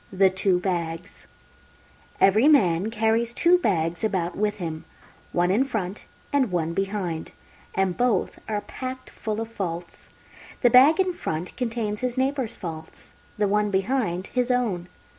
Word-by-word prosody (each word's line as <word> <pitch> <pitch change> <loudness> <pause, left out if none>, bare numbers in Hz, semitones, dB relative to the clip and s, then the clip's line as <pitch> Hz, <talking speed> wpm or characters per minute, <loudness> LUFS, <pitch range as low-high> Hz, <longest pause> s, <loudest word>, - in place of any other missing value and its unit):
THE 190 0 +4
TWO 190 -1 +1
BAGS 175 -1 -4 0.9
Every 215 +8 +5
man 195 - +4
carries 225 +1 0
Two 355 +1 +4
Bags 170 - 0
about 185 -5 -1
with 210 0 0
him, 160 -4 -5 0.5
one 175 +1 +2
in 220 +7 +3
front 210 -7 -4 0.3
and 265 -7 +2
one 170 -2 -1
behind, 195 -4 -2 0.5
and 190 -2 +1
both 245 -2 0
are 210 -1 -1
packed 255 +3 -7
full 215 0 -4
of 225 - -3
faults. 175 -6 -6 0.5
The 245 - +6
Bag 275 +8 +7
in 370 -1 +2
front 165 - -4
contains 225 -4 -2
his 250 0 -2
neighbours' 265 -3 0
faults, 160 -4 -8 0.2
the 205 -1 +2
one 210 +1 +2
behind 195 -2 0
his 250 0 +1
own. 220 -9 0
205 Hz, 145 wpm, -25 LUFS, 180-245 Hz, 0.9 s, Bag